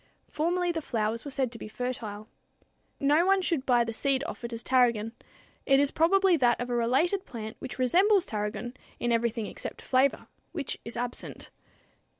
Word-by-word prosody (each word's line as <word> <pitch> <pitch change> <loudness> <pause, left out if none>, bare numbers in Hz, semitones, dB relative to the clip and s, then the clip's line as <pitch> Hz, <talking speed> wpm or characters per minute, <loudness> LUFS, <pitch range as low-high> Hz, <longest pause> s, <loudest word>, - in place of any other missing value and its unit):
Formerly 350 +3 0
the 325 -1 -3
flowers 225 -4 -1
were 285 - -6
said 265 -3 -1
to 230 - -9
be - - -7
fertile. 215 -2 -5 0.7
No 295 +4 +4
one 390 +1 +4
should 335 -7 -1
buy 245 -2 +4
the 230 0 -4
seed 270 +3 +1
offered 245 -7 -6
as 230 0 -5
tarragon. 235 -4 +2 0.6
It 275 0 +5
is 285 -1 +3
probably 380 +3 +4
that 245 -4 +3
of 245 0 -3
a - - +1
related 270 - +2
plant 220 -3 -7
which 265 - -7
resembles 365 - +4
tarragon 210 +3 -4 0.3
in 240 - 0
everything 230 -1 0
except - - -7
flavor 260 +1 +1 0.3
which 300 -6 -4
is 230 +1 -6
absent! 245 0 -4
250 Hz, 170 wpm, -28 LUFS, 230-315 Hz, 0.7 s, It